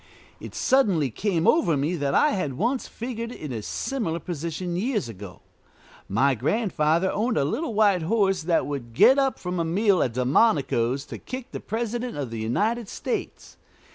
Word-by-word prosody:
It -, -, -9 dB
suddenly 195 Hz, -, +2 dB
came 180 Hz, -, 0 dB
over 175 Hz, -, +3 dB
me 150 Hz, +6 st, 0 dB
that 140 Hz, -4 st, -1 dB
I 300 Hz, -, +4 dB
had 185 Hz, -, -2 dB
once 240 Hz, -, -1 dB
figured 230 Hz, 0 st, -5 dB
in 150 Hz, -, -7 dB
a 115 Hz, -3 st, -4 dB
similar 195 Hz, -, -3 dB
position 170 Hz, +1 st, -4 dB
years 215 Hz, -, -1 dB
ago. 100 Hz, -4 st, -10 dB, 0.7 s
My 130 Hz, +7 st, +3 dB
grandfather 170 Hz, -, +1 dB
owned 225 Hz, +3 st, 0 dB
a 140 Hz, -, +2 dB
little 260 Hz, -, -2 dB
white 205 Hz, -4 st, +4 dB
horse 195 Hz, +1 st, +1 dB
that 165 Hz, +1 st, +1 dB
would 130 Hz, -5 st, -5 dB
get 265 Hz, -, +6 dB
up 270 Hz, -1 st, +1 dB
from 180 Hz, -1 st, -4 dB
a -, -, +1 dB
meal 185 Hz, +3 st, +2 dB
at 120 Hz, -, 0 dB
Delmonico's 130 Hz, -, +2 dB
to -, -, -8 dB
kick 255 Hz, 0 st, -7 dB
the -, -, -5 dB
President 235 Hz, 0 st, -3 dB
of 135 Hz, -5 st, -4 dB
the 115 Hz, -, -4 dB
United 210 Hz, -, -1 dB
States. -, -, -5 dB
180 Hz, 170 wpm, -25 LUFS, 140-230 Hz, 0.7 s, get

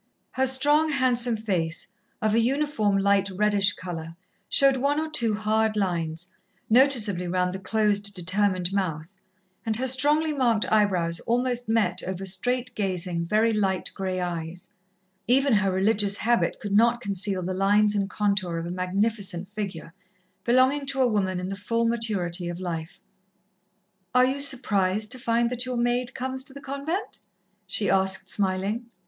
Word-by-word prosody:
Her 265 Hz, 0 st, +1 dB
strong, 290 Hz, +4 st, +3 dB
handsome 250 Hz, -4 st, +1 dB
face, 175 Hz, -7 st, -1 dB, 0.4 s
of 215 Hz, -1 st, +2 dB
a 230 Hz, -, +4 dB
uniform 240 Hz, -5 st, +1 dB
light 200 Hz, 0 st, +2 dB
reddish 205 Hz, 0 st, +2 dB
colour, 165 Hz, -3 st, -7 dB, 0.3 s
showed 275 Hz, -1 st, +4 dB
one 285 Hz, +3 st, +1 dB
or 315 Hz, -, -2 dB
two 235 Hz, -9 st, +1 dB
hard 215 Hz, 0 st, 0 dB
lines, 175 Hz, -2 st, -1 dB, 0.4 s
noticeably 225 Hz, -8 st, +4 dB
round 180 Hz, 0 st, 0 dB
the 190 Hz, -, -5 dB
closed, 205 Hz, 0 st, 0 dB
determined 185 Hz, 0 st, 0 dB
mouth, 165 Hz, -4 st, -2 dB, 0.5 s
and 225 Hz, -1 st, 0 dB
her 255 Hz, +4 st, -1 dB
strongly 295 Hz, +4 st, +2 dB
marked 240 Hz, -6 st, +1 dB
eyebrows 185 Hz, -6 st, +2 dB
almost 245 Hz, 0 st, 0 dB
met 205 Hz, -6 st, +1 dB
over 190 Hz, +1 st, -5 dB
straight 245 Hz, +7 st, -1 dB
gazing, 180 Hz, -5 st, -2 dB
very 220 Hz, +4 st, +2 dB
light 195 Hz, -3 st, -1 dB
grey 185 Hz, -1 st, -3 dB
eyes. 175 Hz, -1 st, -5 dB, 0.6 s
Even 270 Hz, +2 st, +3 dB
her 205 Hz, -2 st, +2 dB
religious 200 Hz, +1 st, +1 dB
habit 235 Hz, +1 st, +1 dB
could 205 Hz, -2 st, -4 dB
not 235 Hz, +3 st, +4 dB
conceal 200 Hz, -3 st, -1 dB
the 185 Hz, +2 st, -3 dB
lines 205 Hz, +2 st, +3 dB
and 200 Hz, -1 st, -1 dB
contour 200 Hz, -5 st, 0 dB
of 165 Hz, -, -4 dB
a 170 Hz, -, -5 dB
magnificent 190 Hz, 0 st, -2 dB
figure, 190 Hz, -6 st, -6 dB, 0.5 s
belonging 260 Hz, +4 st, +2 dB
to 275 Hz, -1 st, -3 dB
a 260 Hz, -, +4 dB
woman 190 Hz, -5 st, 0 dB
in 180 Hz, -, -4 dB
the 195 Hz, -, -4 dB
full 230 Hz, +4 st, -1 dB
maturity 195 Hz, -7 st, -1 dB
of 175 Hz, 0 st, -6 dB
life. 165 Hz, -3 st, -5 dB, 1.2 s
"Are 250 Hz, 0 st, +6 dB
you 265 Hz, +2 st, -1 dB
surprised 215 Hz, -6 st, +1 dB
to 255 Hz, -, -2 dB
find 235 Hz, 0 st, +1 dB
that 250 Hz, +1 st, -2 dB
your 250 Hz, -1 st, -2 dB
maid 240 Hz, +1 st, 0 dB
comes 260 Hz, +1 st, -2 dB
to 270 Hz, -, -5 dB
the 280 Hz, -, -9 dB
convent?" 280 Hz, +9 st, -4 dB, 0.5 s
she 205 Hz, -, 0 dB
asked, 190 Hz, 0 st, 0 dB
smiling. 200 Hz, +4 st, -1 dB
210 Hz, 155 wpm, -25 LUFS, 185-245 Hz, 1.2 s, Are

